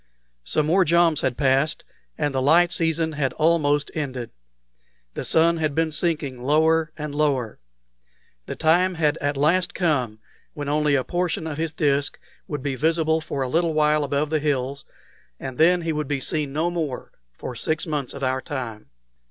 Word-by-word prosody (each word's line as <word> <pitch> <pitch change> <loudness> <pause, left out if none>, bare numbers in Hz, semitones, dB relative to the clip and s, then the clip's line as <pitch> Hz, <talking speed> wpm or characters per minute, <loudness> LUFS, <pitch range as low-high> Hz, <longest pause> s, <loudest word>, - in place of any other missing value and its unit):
Some 155 - 0
more 180 +5 +4
joms 170 -2 +3
had 130 -2 -1
passed, 140 +2 +1 0.3
and 145 -2 -1
the 130 - 0
light 165 +5 +4
season 165 -1 0
had 145 -3 -1
almost 150 -2 +2
ended. 130 -6 -4 0.8
The - - -4
sun 165 +1 +3
had 155 -3 -1
been 160 -1 +1
sinking 150 -6 -2
lower 160 +4 +2
and 150 -1 -5
lower. 140 -7 0 0.9
The - - -4
time 175 +3 +2
had 155 -1 +1
at 145 0 -1
last 170 +6 +2
come 140 - 0 0.4
when 145 -2 -5
only 150 -1 +2
a 130 - +1
portion 175 0 -2
of 155 -2 -5
his 165 -1 -1
disk 145 -3 0 0.3
would 145 -3 -5
be 140 -2 -1
visible 160 +3 +1
for 140 -3 -3
a - - -2
little 165 +4 0
while 150 0 +3
above 145 +2 -1
the 155 - +2
hills, 140 -2 -2 0.5
and 130 +1 -7
then 175 +2 +5
he 165 -1 -1
would 150 -2 -3
be 145 -1 -1
seen 150 +1 -1
no 160 +5 0
more 155 -7 -4 0.3
for 125 - -6
six 155 +6 -1
months 150 -6 -3
of 140 - -7
our 130 0 0
time. 120 -7 -6
150 Hz, 175 wpm, -23 LUFS, 140-160 Hz, 0.9 s, then